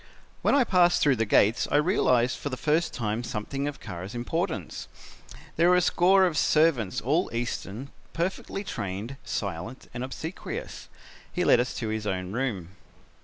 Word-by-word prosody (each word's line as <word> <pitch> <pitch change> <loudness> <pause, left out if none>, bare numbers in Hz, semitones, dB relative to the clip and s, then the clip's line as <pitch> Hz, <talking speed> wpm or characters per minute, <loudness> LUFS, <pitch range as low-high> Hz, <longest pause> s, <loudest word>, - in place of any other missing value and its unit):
"When - - +3
I 280 - +5
passed 180 -5 +4
through 140 -4 +4
the 115 0 0
gates 105 +3 +3
I - - 0
realized 130 - +3
for 145 - -3
the 130 - -4
first 155 +5 +1
time 110 0 -2
something 125 +5 -3
of 145 - -5
Kara's 90 +5 -7
importance. 160 - -3 0.7
There 170 +2 +5
were 180 - +6
a 180 - +4
score 190 +3 +4
of 160 -5 +1
servants, 150 - +2
all 155 - +1
Eastern, 120 +1 -4 0.2
perfectly 190 +3 -3
trained, 105 - -5
silent 100 +5 -5
and 120 +1 -4
obsequious. 160 +7 -6 0.4
He - - -1
led - - +6
us 125 +1 -1
to 115 -3 -3
his 110 -1 -3
own 90 -1 -2
room. 105 -8 -2
125 Hz, 165 wpm, -27 LUFS, 110-165 Hz, 0.7 s, were